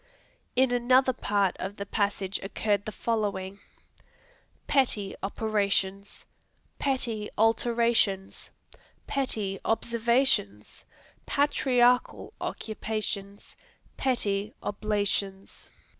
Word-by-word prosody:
In 260 Hz, 0 st, +4 dB
another 255 Hz, +2 st, +4 dB
part 200 Hz, -4 st, +1 dB
of 195 Hz, +2 st, -4 dB
the 200 Hz, -, -4 dB
passage 200 Hz, -1 st, -1 dB
occurred 205 Hz, +1 st, -1 dB
the 215 Hz, -, -4 dB
following: 205 Hz, -4 st, -2 dB, 1.1 s
Petty 230 Hz, -8 st, +1 dB
operations. 200 Hz, -1 st, -1 dB, 0.5 s
Petty 235 Hz, -6 st, -1 dB
alterations. 225 Hz, -3 st, +1 dB, 0.6 s
Petty 215 Hz, -8 st, -2 dB
observations. 235 Hz, -, +1 dB, 0.4 s
Patriarchal 250 Hz, -3 st, +2 dB
occupations. 210 Hz, -2 st, -4 dB, 0.4 s
Petty 210 Hz, -5 st, 0 dB
oblations. 205 Hz, -2 st, -2 dB
215 Hz, 70 wpm, -28 LUFS, 200-240 Hz, 1.1 s, In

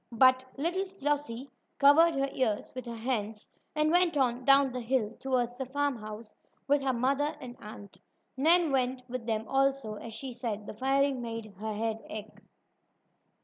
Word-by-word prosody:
But 255 Hz, +2 st, +5 dB
little 350 Hz, +7 st, 0 dB
Flossie 290 Hz, -8 st, -2 dB, 0.3 s
covered 310 Hz, +3 st, +6 dB
her 275 Hz, 0 st, +1 dB
ears 220 Hz, -5 st, -1 dB
with 255 Hz, -1 st, -7 dB
her 235 Hz, -, -5 dB
hands 220 Hz, -2 st, -3 dB, 0.3 s
and 305 Hz, 0 st, +2 dB
went 350 Hz, -3 st, +3 dB
on 250 Hz, -2 st, +1 dB
down 275 Hz, -1 st, +6 dB
the 250 Hz, 0 st, -4 dB
hill, 235 Hz, -2 st, 0 dB
toward 255 Hz, -3 st, 0 dB
the 265 Hz, +1 st, -4 dB
farmhouse, 235 Hz, -6 st, -3 dB, 0.3 s
with 285 Hz, 0 st, +3 dB
her 270 Hz, -1 st, +1 dB
mother 275 Hz, +4 st, 0 dB
and 245 Hz, -2 st, -8 dB
aunt. 205 Hz, -2 st, -11 dB, 0.4 s
Nan 325 Hz, +3 st, +4 dB
went 255 Hz, -1 st, 0 dB
with 245 Hz, -2 st, -5 dB
them 220 Hz, -1 st, -1 dB
also, 270 Hz, -5 st, +1 dB
as 225 Hz, +1 st, -8 dB
she 260 Hz, +2 st, -6 dB
said 225 Hz, -4 st, -4 dB
the -, -, -7 dB
firing 270 Hz, +3 st, +1 dB
made 230 Hz, -3 st, -6 dB
her 215 Hz, 0 st, -3 dB
head 225 Hz, +1 st, -1 dB
ache. 215 Hz, 0 st, -8 dB
255 Hz, 165 wpm, -30 LUFS, 225-275 Hz, 0.4 s, covered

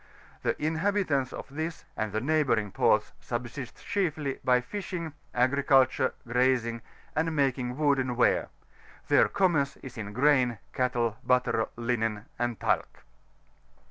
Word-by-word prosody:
The -, -, -1 dB
inhabitants 160 Hz, -4 st, 0 dB
of -, -, -7 dB
this 160 Hz, +2 st, -4 dB
and 110 Hz, -1 st, -2 dB
the 110 Hz, +2 st, -1 dB
neighbouring 130 Hz, -8 st, +1 dB
ports -, -, +2 dB
subsist 120 Hz, +2 st, -6 dB
chiefly 155 Hz, -8 st, -1 dB
by 125 Hz, -1 st, +4 dB
fishing, 170 Hz, +2 st, -5 dB, 0.2 s
agriculture, 130 Hz, +1 st, +3 dB
grazing, 120 Hz, -1 st, +1 dB, 0.3 s
and 160 Hz, +1 st, 0 dB
making 130 Hz, -3 st, 0 dB
wooden 135 Hz, -4 st, +2 dB
ware; 120 Hz, -, +2 dB, 0.6 s
their -, -, +5 dB
commerce 160 Hz, -8 st, +1 dB
is 130 Hz, -4 st, -8 dB
in 100 Hz, -1 st, -5 dB
grain, 125 Hz, -1 st, +3 dB, 0.2 s
cattle, 120 Hz, -4 st, 0 dB
butter, 125 Hz, -3 st, +2 dB
linen, 115 Hz, -3 st, -1 dB
and 120 Hz, -2 st, -1 dB
tsuc. -, -, +1 dB
130 Hz, 120 wpm, -28 LUFS, 120-150 Hz, 0.6 s, their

